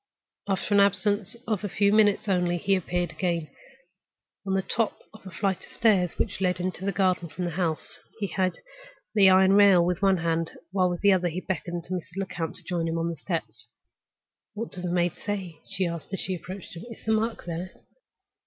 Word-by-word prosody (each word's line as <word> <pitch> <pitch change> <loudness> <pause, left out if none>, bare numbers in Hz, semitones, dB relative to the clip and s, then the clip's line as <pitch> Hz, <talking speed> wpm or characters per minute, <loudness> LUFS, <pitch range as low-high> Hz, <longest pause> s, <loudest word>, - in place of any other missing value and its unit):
After 195 +1 0
an 200 - +6
absence 200 +2 +2
of 215 -3 -1
a 205 - -2
few 200 +2 +2
minutes 210 -1 +4
only 180 -2 +2
he 195 +3 +1
appeared 175 -2 -1
again, 170 -4 -2 1.0
on 190 - +1
the 190 - +1
top 225 +1 0 0.2
of 220 - -14
the 190 - -10
flight 190 +1 0
of - - -14
steps 195 -6 +2
which - - -2
led 180 -1 +1
into 180 0 -3
the 200 - 0
garden 185 -3 +1
from 180 +3 -4
the 175 - -2
house. 165 -2 -2 0.2
He 205 - 0
held 185 -2 0
by - - -18 0.5
the 195 -3 +7
iron 190 +1 +6
rail 200 -4 +7
with 180 0 -1
one 195 -1 +4
hand, 165 0 -1 0.2
while 185 -1 +2
with 175 -1 -3
the 200 -1 +6
other 180 -1 +2
he 170 +1 -3
beckoned 175 -2 -3
to 180 - -6
Mrs. 180 0 -5
Lecount 175 -4 -3
to 180 - -15
join 170 -1 -1
him 165 0 -1
on 165 +1 0
the 170 - -3
steps. 165 +1 -5 0.9
"What 225 +2 -4
does 180 -1 -6
the 175 - -1
maid 175 -1 +2
say?" 190 -6 -4
she 195 -2 0
asked, 170 0 -5
as 195 - -1
she 190 - -1
approached 185 +1 -8
him. 170 - -8
"Is 230 - -11
the 220 - +1
mark 225 +1 0
there?" 175 +2 -4
185 Hz, 215 wpm, -27 LUFS, 175-200 Hz, 1.0 s, the